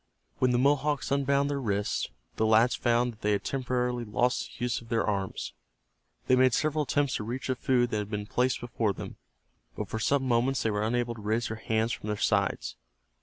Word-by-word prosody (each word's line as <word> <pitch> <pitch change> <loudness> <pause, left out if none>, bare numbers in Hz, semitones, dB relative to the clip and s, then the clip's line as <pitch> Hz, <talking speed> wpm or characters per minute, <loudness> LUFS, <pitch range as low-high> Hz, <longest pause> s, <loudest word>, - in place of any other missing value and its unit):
When 130 - +3
the 125 - +2
Mohawk 145 +2 +2
unbound 140 0 +2
their 140 -1 -2
wrists 105 -3 -1 0.3
the 110 - +1
lads 110 +3 +5
found 120 0 +1
that 110 - -22
they 105 0 +2
had 100 - -1
temporarily 125 -2 -1
lost 120 +3 0
the 120 - -5
use 125 -1 0
of 115 - -15
their 115 0 +1
arms. 100 -3 -2 0.7
They 130 - +4
made 130 -1 +4
several 155 -1 +1
attempts 145 0 +1
to - - -5
reach 120 +5 -4
the 130 - +1
food 125 -1 +1
that 110 - 0
had 105 -1 -4
been 105 -1 -3
placed 125 +4 0
before 115 -4 -1
them, - - -8 0.6
but - - -4
for 110 - -3
some 140 +4 +2
moments 130 +1 +1
they 110 - +1
were 105 0 -1
unable 120 0 0
to 110 - -11
raise 110 +2 0
their 110 - -4
hands 110 0 0
from 105 - -5
their 105 0 -1
sides. 100 -1 0
120 Hz, 215 wpm, -29 LUFS, 110-130 Hz, 0.7 s, lads